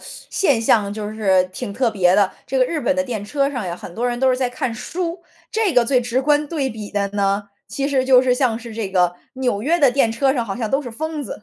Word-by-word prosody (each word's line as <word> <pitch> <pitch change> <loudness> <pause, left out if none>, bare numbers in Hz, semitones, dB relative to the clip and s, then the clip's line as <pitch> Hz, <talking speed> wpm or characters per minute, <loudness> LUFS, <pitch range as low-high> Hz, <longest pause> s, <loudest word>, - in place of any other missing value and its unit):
现 280 -12 -1
象 210 -3 +2
就 210 0 -5
是 190 -4 +3
挺 200 - -5
特 240 +2 +1
别 185 -3 +3
的， 200 -2 +3 0.2
这 265 - -2
个 255 - +5
日 310 +5 -2
本 280 +2 +1
的 275 - +2
电 230 -6 -4
车 275 +4 0
上 245 -8 -4
呀， 175 -1 -4
很 175 - -10
多 240 +3 -1
人 240 0 -2
都 265 0 +3
是 255 - +1
在 255 -1 0
看 245 -2 -3
书， 340 +7 -4 0.3
这 435 -4 +1
个 245 -1 +5
最 255 +1 +2
直 245 +2 -1
观 295 +1 +2
对 280 -5 -1
比 215 -2 -8
的 200 -1 -1
呢， 200 0 -1 0.2
其 275 - -2
实 270 -2 +1
就 260 -1 +6
是 250 -1 +2
像 250 -4 +1
是 235 -1 -9
这 220 -3 -3
个 180 -2 +2 0.2
纽 250 -6 -1
约 335 +6 +2
的 275 -4 +5
电 250 -3 +2
车 265 +4 +2
上 245 -4 -1
好 195 -3 -5
像 225 -3 -3
都 270 - +2
是 250 -5 -7
疯 315 +5 -4
子。 240 - -8
245 Hz, 285 characters per minute, -20 LUFS, 210-275 Hz, 0.3 s, 就